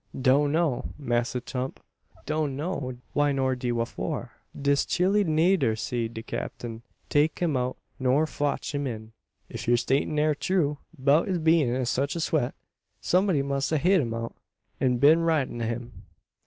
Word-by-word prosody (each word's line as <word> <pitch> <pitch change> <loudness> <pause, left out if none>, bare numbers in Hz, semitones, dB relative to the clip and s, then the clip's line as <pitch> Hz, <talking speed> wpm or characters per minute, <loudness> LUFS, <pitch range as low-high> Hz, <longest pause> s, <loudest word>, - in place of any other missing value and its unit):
"Doan 140 +3 +4
know, 155 -7 0
Massa 120 -3 -1
Tump; 130 +1 -4 0.5
doan 155 -2 -1
know 140 -4 -3
de - - -14 0.2
why 145 0 +3
nor 130 -1 +1
de 125 -1 -3
whafor. 115 -1 -3 0.3
Dis 140 0 +2
chile 195 +3 +2
neider 160 - +3
see 115 +1 -2
de 115 0 -8
Cap'n 115 -1 -5 0.3
take 150 +2 +2
um 160 -5 +1
out 125 0 -1 0.2
nor 130 +4 +3
fotch 145 -1 -2
um 145 -1 -1
in." 110 -2 -6 0.4
"If - - -7
yur 120 0 +5
statement 135 +5 0
air 155 0 +3
true 150 -2 0 0.2
'beout 140 +4 +3
his 185 -2 0
bein' 160 -4 +3
in 130 -1 0
sech 140 +5 0
a - - -2
sweat, 155 -6 0 0.4
someb'dy 180 -6 +2
must 140 +1 -1
a 155 - +3
hed 180 +4 +4
him 115 -3 -3
out, 115 0 -4 0.5
an 125 -2 +2
been 150 +6 +6
ridin' 155 -8 0
o' - - 0
him." 120 +1 -6
140 Hz, 170 wpm, -27 LUFS, 125-155 Hz, 0.5 s, been